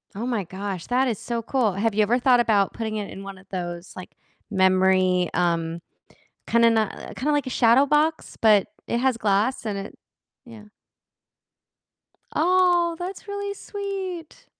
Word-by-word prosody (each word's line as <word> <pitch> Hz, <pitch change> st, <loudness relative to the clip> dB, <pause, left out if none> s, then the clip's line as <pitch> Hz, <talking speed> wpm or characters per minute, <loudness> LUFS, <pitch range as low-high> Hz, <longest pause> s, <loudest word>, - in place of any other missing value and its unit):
Oh 220 Hz, +4 st, -4 dB
my 235 Hz, -5 st, -1 dB
gosh, 190 Hz, 0 st, -6 dB
that 255 Hz, +2 st, +2 dB
is 225 Hz, -5 st, -2 dB
so 235 Hz, -1 st, -3 dB
cool. 235 Hz, -4 st, 0 dB
Have 210 Hz, +3 st, 0 dB
you 215 Hz, -, +2 dB
ever 230 Hz, +4 st, +3 dB
thought 250 Hz, -1 st, +4 dB
about 210 Hz, -4 st, +2 dB
putting 220 Hz, -1 st, -4 dB
it 205 Hz, -1 st, -5 dB
in 195 Hz, -, -9 dB
one 195 Hz, -1 st, -8 dB
of 185 Hz, -, -17 dB
those, 175 Hz, -1 st, -5 dB
like, 185 Hz, -, -9 dB, 0.4 s
memory, 185 Hz, -2 st, +3 dB
um, 170 Hz, -1 st, 0 dB, 0.7 s
kinda 235 Hz, 0 st, +4 dB
n 230 Hz, -, +3 dB
uh, 215 Hz, -2 st, -3 dB
kinda, 295 Hz, +5 st, -1 dB
like, 290 Hz, -3 st, 0 dB
a -, -, -2 dB
shadow 245 Hz, +2 st, +4 dB
box, 300 Hz, +3 st, 0 dB
but 210 Hz, -3 st, +4 dB, 0.2 s
it 235 Hz, -, 0 dB
has 255 Hz, -2 st, +1 dB
glass 215 Hz, +5 st, 0 dB
and 210 Hz, -2 st, -2 dB
it 195 Hz, +1 st, -8 dB, 0.5 s
Yeah. 225 Hz, -3 st, -13 dB, 1.7 s
Aw, 350 Hz, 0 st, +3 dB
that's 370 Hz, +4 st, -6 dB
really 405 Hz, 0 st, -4 dB
sweet! 390 Hz, -5 st, -6 dB
225 Hz, 165 wpm, -24 LUFS, 195-275 Hz, 1.7 s, thought